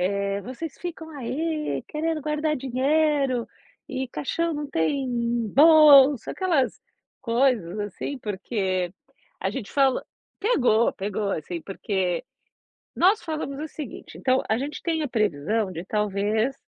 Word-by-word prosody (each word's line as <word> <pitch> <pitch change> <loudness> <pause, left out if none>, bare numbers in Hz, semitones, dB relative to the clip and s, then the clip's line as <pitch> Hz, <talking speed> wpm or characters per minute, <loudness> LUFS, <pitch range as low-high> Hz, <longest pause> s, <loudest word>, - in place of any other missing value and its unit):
eh, 200 0 -1
"vocês 265 +5 -7
ficam 325 -2 -6
aí 305 +5 -2
querendo 315 +1 -2
guardar 305 +1 0
dinheiro, 270 -1 +1 0.4
e 265 -1 -3
caixão 335 +6 -2
não 295 0 -3
tem 265 - 0 0.5
bolsa", 290 -4 +7
aquelas 330 -9 0 0.4
coisas 235 -7 +1
assim 205 +7 -4
porque 190 -4 -2 0.5
a - - 0
gente 245 -7 -6
falou 270 -2 +3 0.4
pegou, 250 - +3
pegou 200 +1 -3
assim 165 +2 -4
porque, 190 -3 -2 0.7
nós 385 +5 +4
falamos 305 -3 -4
o 310 - -4
seguinte, 290 -6 -9
então 260 0 +2
a 220 - +2
gente 285 +5 -4
tem 325 -2 0
a - - -1
previsão 210 - 0
de 170 -1 -6
talvez, 210 +4 0
260 Hz, 125 wpm, -25 LUFS, 210-300 Hz, 0.7 s, bolsa